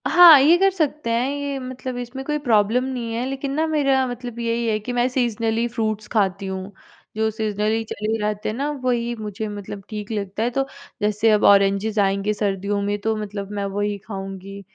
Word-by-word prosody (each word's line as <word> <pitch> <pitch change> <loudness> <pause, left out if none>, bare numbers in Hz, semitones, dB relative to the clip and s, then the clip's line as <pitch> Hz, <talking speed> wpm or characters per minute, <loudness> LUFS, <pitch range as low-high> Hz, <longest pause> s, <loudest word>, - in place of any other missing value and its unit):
हाँ, 345 -5 +9
ये 310 +5 +6
कर 390 +2 +4
सकते 300 -7 -1
हैं, 235 +2 +1
ये 285 -1 -3
मतलब 255 0 -6
इसमें 245 +2 -6
कोई 300 +1 0
प्रॉब्लम 225 +1 +3
नहीं 245 -3 -4
है 235 +2 -1
लेकिन 270 0 -3
ना 315 +1 +2
मेरा 275 -4 +2
मतलब 245 -1 -6
यही 235 0 -1
है 215 -1 +2
कि 245 +4 -5
मैं 245 0 +2
सीज़नली 230 -2 0
फ्रूट्स 215 -2 -2
खाती 195 -2 +1
हूँ। 190 +1 -5 0.4
जो 220 0 +1
सीज़नली 215 +1 -1
चले 220 0 -2
रहतें 210 0 -2
हैं 215 - -3
ना, 285 +2 -1
वही 245 -4 -1
मुझे 215 0 -5
मतलब 205 -1 -7
ठीक 210 0 -6
लगता 205 0 -2
है 235 - +1
तो 270 +2 0 0.4
जैसे 210 +2 +2
अब 210 - +3
ऑरेंजेस 200 +2 +4
आएँगे 200 +1 +1
सर्दियों 200 -1 -1
में 205 +1 -1
तो 220 +1 0
मतलब 205 -1 -5
मैं 200 -1 -2
वही 205 0 0
खाऊँगी। 195 -1 -7
220 Hz, 195 wpm, -22 LUFS, 205-250 Hz, 0.4 s, हाँ